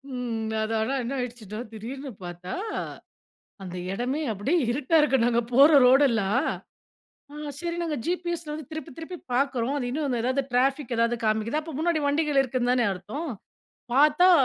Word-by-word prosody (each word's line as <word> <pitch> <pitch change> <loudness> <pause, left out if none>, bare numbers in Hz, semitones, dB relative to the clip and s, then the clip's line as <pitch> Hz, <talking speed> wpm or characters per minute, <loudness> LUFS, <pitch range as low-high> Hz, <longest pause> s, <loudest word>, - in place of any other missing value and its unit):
ம். 225 -3 -3
அது 220 +1 -2
ஆனா, 265 +5 0
என்ன 255 +4 -3
ஆயிடுச்சுன்னா 230 -4 -5
திடீர்னு 260 +5 -6
பார்த்தா, 175 +1 -7 1.1
அந்த 180 0 -6 0.2
இடமே 255 +8 -1
அப்டியே 285 - +1
இருட்டா 285 +5 +1
இருக்கு 265 -5 +3
நாங்க 240 0 +2
போற 280 +4 +8 0.2
ரோடெல்லாம். 250 -1 +4 1.1
சரி 340 0 -3
நாங்க 310 -4 -2
ஜிபிஎஸ 345 -1 -2
வந்து 305 -3 -6
திருப்பி 315 -3 -6
திருப்பி 345 +2 -7 0.2
பார்க்குறோம். 270 -1 +1
அது 250 - -2
இன்னும் 275 -4 -1
எதாவது 260 +2 +1
டிராபிக் 265 0 +1
ஏதாவது 230 +1 +2
காமிக்குது 220 +7 +1
அப்ப 320 +1 -8
முன்னாடி 330 -1 +1
வண்டிகள் 290 -1 +2
இருக்குதுன்னு 250 -1 0
தானே 245 -2 +2
அர்த்தம் 270 - -6 0.7
பார்த்தா, 300 +6 +6
265 Hz, 145 wpm, -26 LUFS, 235-300 Hz, 1.1 s, போற